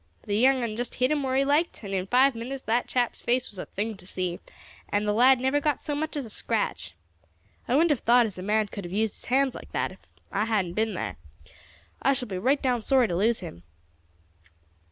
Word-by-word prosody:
The 205 - -2
young 260 +3 +4
un 220 -2 -2
just 245 +1 -4
hit 255 +2 +1
him 300 -1 +1
where 260 -1 -1
he 275 +1 +3
liked, 295 0 +1
and 200 -1 -5
in 185 0 -1
five 260 +5 +4
minutes 255 +4 -6
that 235 +3 0
chap's 245 -2 0
face 250 +1 0
was 200 - -9
a - - -5
thing 215 +2 -3
to 180 - -14
see, 180 -2 -3 0.5
and 205 +1 0
the 210 - +2
lad 255 +4 +5
never 265 +3 +1
got 295 -1 0
so 295 - -3
much 310 +1 -3
as 280 - -3
a - - -10
scratch. - - -2 0.7
I 250 - +2
wouldn't 325 +3 +4
have 285 - +1
thought 240 +1 +5
as 205 -4 -6
a - - -5
man 210 +2 +1
could 200 - -7
have 175 - -7
used 215 +2 0
his - - -12
hands 265 +1 +2
like - - -10
that - - -1
if - - -14 0.3
I 205 +2 0
hadn't 200 -6 0
been 220 0 0
thar. 100 - -4 0.8
I 275 - +3
shall 260 -2 -3
be 190 -3 -4
right 265 +8 +2
down 250 -3 0
sorry 260 +1 +3
to 175 - -1
lose 220 +6 +2
him." 85 - -8
235 Hz, 235 wpm, -26 LUFS, 205-265 Hz, 0.8 s, lad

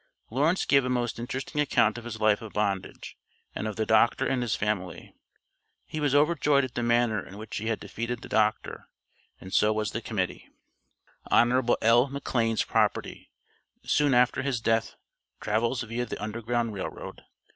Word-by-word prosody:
Lawrence 150 +9 +1
gave 140 -2 +4
a 125 - -2
most 120 -2 -1
interesting 130 +4 -3
account 145 - +2
of 120 -1 -8
his 115 -2 -6
life 110 -1 +3
of 110 -2 -9
bondage, 100 -2 -3 0.4
and 110 - -3
of 105 - -4
the 110 - -1
doctor 110 +2 +3
and 130 -2 0
his 120 -3 0
family. 105 -4 -3 0.7
He 155 - -5
was 145 -2 +1
overjoyed 145 -2 +3
at 130 - -5
the 120 - -2
manner 120 -3 +2
in 100 - -12
which 110 +1 -6
he 110 - -4
had 115 -1 -1
defeated 115 +4 -5
the - - -8
doctor, 110 0 0 0.5
and 95 - -10
so 105 - +4
was 110 -1 -1
the - - -4
Committee. - - -3 0.8
HON. 120 +1 +3
L. 120 +4 +5
McLANE'S 120 -5 -1
PROPERTY, - - -1 0.5
SOON 145 -3 +2
AFTER 125 0 +3
HIS 135 -3 -1
DEATH, 115 0 0 0.4
TRAVELS 115 +4 0
viâ 115 +1 -4
THE - - -5
UNDERGROUND 115 +2 -2
RAIL 95 - -4
ROAD. - - -10
115 Hz, 170 wpm, -27 LUFS, 110-125 Hz, 0.8 s, L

